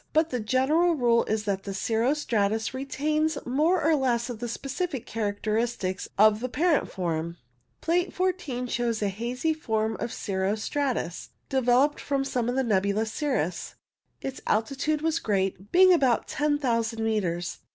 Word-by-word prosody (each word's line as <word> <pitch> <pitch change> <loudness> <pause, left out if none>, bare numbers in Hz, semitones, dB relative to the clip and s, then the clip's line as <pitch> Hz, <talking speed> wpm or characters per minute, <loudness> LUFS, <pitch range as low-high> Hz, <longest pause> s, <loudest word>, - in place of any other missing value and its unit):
But 315 +1 +2
the 250 - -1
general 280 +10 +2
rule 235 -4 +3
is 215 0 -1
that 200 -2 -1
the 195 -1 -6
cirro 230 +7 +1
stratus 220 -5 0
retains 300 +3 -1
more 310 +7 +2
or 320 +1 +4
less 245 -3 0
of 230 - -7
the 240 - -3
specific 275 +3 -4
characters 220 +2 -1 0.4
of 215 +1 +5
the 255 +2 -3
parent 320 +4 +1
form. 170 -2 -3 0.4
Plate 350 +2 +1
14 355 -9 -2
shows 235 -3 -1
a 205 - +1
hazy 245 +10 -1
form 220 -7 -1
of 235 - -3
cirro 195 0 -1
stratus 235 - -2 0.2
de 265 -1 +1
veloped 255 +4 +3
from 275 -1 -1
the 250 0 0
nebulous 210 0 0
cirrus. 185 - -2 0.5
Its 270 -1 -5
altitude 275 +7 0
was 325 0 +1
great, 195 -1 -1
being 370 +1 +7
about 265 -8 +2
10,000 240 -7 0
metres. 180 -6 -1
245 Hz, 150 wpm, -27 LUFS, 215-290 Hz, 0.5 s, being